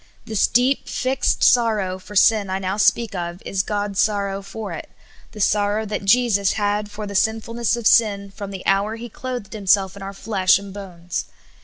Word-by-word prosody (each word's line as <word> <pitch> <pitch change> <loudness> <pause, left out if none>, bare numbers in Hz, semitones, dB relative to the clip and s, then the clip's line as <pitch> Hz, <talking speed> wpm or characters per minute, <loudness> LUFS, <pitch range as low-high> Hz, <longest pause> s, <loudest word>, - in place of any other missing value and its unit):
This 220 -2 +1
deep, 255 +4 +1
fixed 260 +1 0
sorrow 215 -6 +3
for 205 +2 -12
sin 210 0 +4
I 190 - -1
now 190 0 -2
speak 225 +1 +2
of 175 -1 -4
is 195 - 0
God's 205 -1 -3
sorrow 200 -2 0
for 195 -1 -7
it 160 - -8 0.2
— - - -27
the 215 - -10
sorrow 205 +2 +1
that 210 -1 -4
Jesus 205 -2 +3
had 205 0 -1
for 210 +1 -7
the 200 - -7
sinfulness 225 +3 0
of 235 -2 -6
sin, 200 -4 +3
from 200 0 -7
the 195 -2 -8
hour 200 +3 +1
He 235 +1 -8
clothed 245 -3 -6
Himself 195 -2 +2
in 200 - -11
our 195 0 -5
flesh 195 -2 +2
and 200 -1 -9
bones. 180 -4 -6
205 Hz, 190 wpm, -21 LUFS, 195-220 Hz, 0.2 s, sin